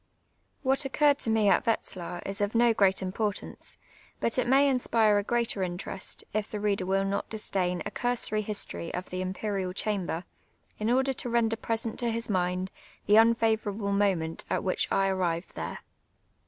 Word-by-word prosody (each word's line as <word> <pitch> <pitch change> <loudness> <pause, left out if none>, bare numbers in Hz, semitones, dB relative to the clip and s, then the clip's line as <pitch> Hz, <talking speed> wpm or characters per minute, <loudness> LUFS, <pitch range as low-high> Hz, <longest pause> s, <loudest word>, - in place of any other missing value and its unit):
What 270 +1 +2
occurred 285 +1 +3
to - - -2
me 220 -2 +3
at 215 - +3
Wetzlar 180 -5 -2
is 195 +1 -3
of 205 +2 0
no 235 0 +5
gi'eat 195 -2 +3
importance, 205 +2 -3 0.4
but 230 - +1
it 255 - +1
may 275 +3 +5
inspire 225 -5 +3
a - - -2
greater 235 -2 0
interest, 185 +1 -3
if 215 0 -2
tlie 210 - -3
reader 200 -3 0
will 195 +1 +2
not 200 +1 -2
disdain 185 -4 -1
a - - -3
cui 245 0 0
sory 215 -2 -1
lii.story 85 - -3
of 180 +1 -5
the 185 0 -2
Imperial 190 0 -2
Chamber, 185 -4 -1 0.6
in 215 +1 0
order 265 +2 +2
to 245 - -3
render 230 -1 +2
present 225 0 -2
to 240 - +1
his 230 -1 -2
mind 180 0 0 0.3
the 205 - +2
mifavom 230 +1 +6 0.3
able 200 -2 -2
moment 190 -5 +1
at - - 0
which 185 - -1
I 195 0 +3
arrived 180 -2 -1
there. - - -5
205 Hz, 180 wpm, -28 LUFS, 185-230 Hz, 0.6 s, mifavom